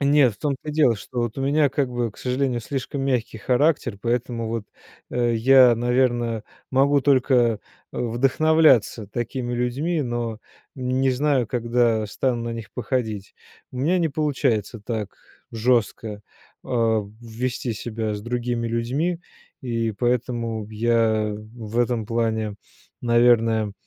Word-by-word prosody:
Нет, 140 -4 +4
в - - -25
том 145 -2 0
то 155 - -9
и - - -2
дело, 150 -6 +4
что 120 +4 -8
вот 120 +1 -3
у - - -2
меня 145 +1 +3
как 135 -1 -1
бы, 120 -2 -1
к - - -23
сожалению, 125 -1 -1
слишком 135 +3 -4
мягкий 125 -4 -1
характер, 125 -1 +1
поэтому 120 0 -1
вот, 115 -1 -3 0.5
э, 120 -1 +1
я, 125 +1 +6
наверное, 120 -2 +1 0.3
могу 140 +2 +3
только, 135 -1 +3
э, 120 -3 +3 0.4
вдохновляться 130 -1 +3
такими 120 +3 -3
людьми, 140 +7 -1
но 120 -3 -3 0.4
не 130 +1 +1
знаю, 130 -1 +1
когда 120 -2 +1
стану 120 +2 -1
на 115 - -3
них 115 -2 -7
походить. 110 -5 -3 0.4
У 125 - -6
меня 165 +8 +2
не 165 -2 +1
получается 135 -7 0
так 105 -1 -4 0.4
жестко, 115 -2 0 0.4
а, 115 -4 +1 0.2
вести 120 +1 -3
себя 110 0 -3
с 105 - -5
другими 120 0 -2
людьми 135 +10 -1 0.4
и 115 -3 -1
поэтому 115 -1 -1
я 110 -1 +1 0.2
в 115 0 -5
этом 120 -3 +1
плане, 110 -2 -1 0.5
наверное, 115 -3 +3
120 Hz, 140 wpm, -23 LUFS, 115-130 Hz, 0.5 s, я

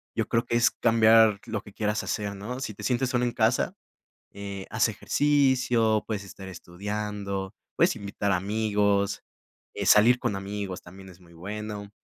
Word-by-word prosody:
Yo 110 -1 -1
creo 115 0 0
que 120 - -1
es 120 - +4
cambiar 110 -2 +4
lo 110 -2 -4
que 105 - -15
quieras 105 -1 -1
hacer, 100 -1 -3
¿no? 115 +6 -6
Si 120 -5 -4
te - - -11
sientes 130 0 0
solo 125 -1 0
en 120 - 0
casa, - - +1 0.6
eh, 100 -1 -7
haz 110 +2 +2
ejercicio, 125 -4 +2
puedes 105 -2 -4
estar 95 0 -10
estudiando, 100 +2 -5 0.2
puedes - - +3
invitar 100 0 -3
amigos. 100 +1 +1 0.5
Eh, - - -4
salir 120 +4 +6
con 100 - -1
amigos 100 -1 -5
también 95 +2 -13
es 90 0 -16
muy 85 -1 -18
bueno. 105 +3 -6
105 Hz, 165 wpm, -26 LUFS, 100-115 Hz, 0.6 s, salir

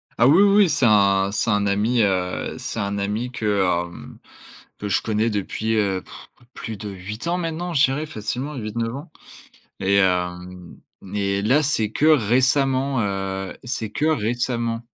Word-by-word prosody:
Ah 120 - +4
oui, 165 +8 +6
oui, 200 -2 +5
c'est 150 -5 +2
un 100 -2 +3
c'est 110 +2 -1
un 105 0 +1
ami, 110 +4 +1
heu, 90 -3 -1
c'est 115 - -5
un 100 0 -2
ami 105 +5 -2
que, 105 -5 0 0.3
hem, 85 - -12 0.6
que 105 - -4
je 100 - +1
connais 110 +1 0
depuis, 110 +2 -2
heu, 95 -3 0
pff, - - -13 0.3
plus 110 -2 -6
de 105 +1 -6
8 100 - -7
ans 175 +1 0
maintenant, 170 +1 -3
je 140 -1 +5
dirais 140 +4 -2
facilement 130 +5 -4
8-9 115 0 -3
ans 150 +3 -9 0.7
et 100 +1 +2
hem 90 -1 -1 0.4
et 100 -1 0
là, 135 +8 +3
c'est 110 -7 0
que 155 - +1
récemment, 130 0 +2
heu, 95 -1 -3
c'est 115 -4 -4
que 150 - -1
récemment, 120 -3 -1
110 Hz, 165 wpm, -22 LUFS, 100-130 Hz, 0.7 s, oui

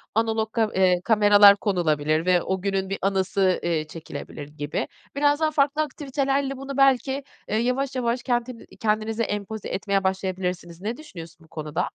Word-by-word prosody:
analog 220 -1 0
ka 220 -2 +1
eee, 185 -2 +3
kameralar 205 -2 +7
konulabilir 155 -5 0
ve 180 -1 +4
o 190 -1 -2
günün 195 -1 -1
bir 195 - -2
anısı, 190 -1 +1
eee, 160 -3 -1
çekilebilir 155 -2 -8
gibi. 150 - -4 0.3
Biraz 290 +1 +3
daha 315 -1 +1
farklı 290 +1 +2
aktivitelerle 275 -2 -1
bunu 275 0 -6
belki, 270 0 +3 0.3
eee, 215 - +1
yavaş 255 +3 0
yavaş 245 0 -1
kentin 240 -1 -2
kendinize 220 +1 0
empoze 205 0 -4
etmeye 195 -1 -1
başlayabilirsiniz. 185 -2 -3
Ne 225 +4 -3
düşünüyorsun 170 - -11
bu - - -25
konuda? 155 +2 -3
205 Hz, 155 wpm, -24 LUFS, 180-255 Hz, 0.3 s, kameralar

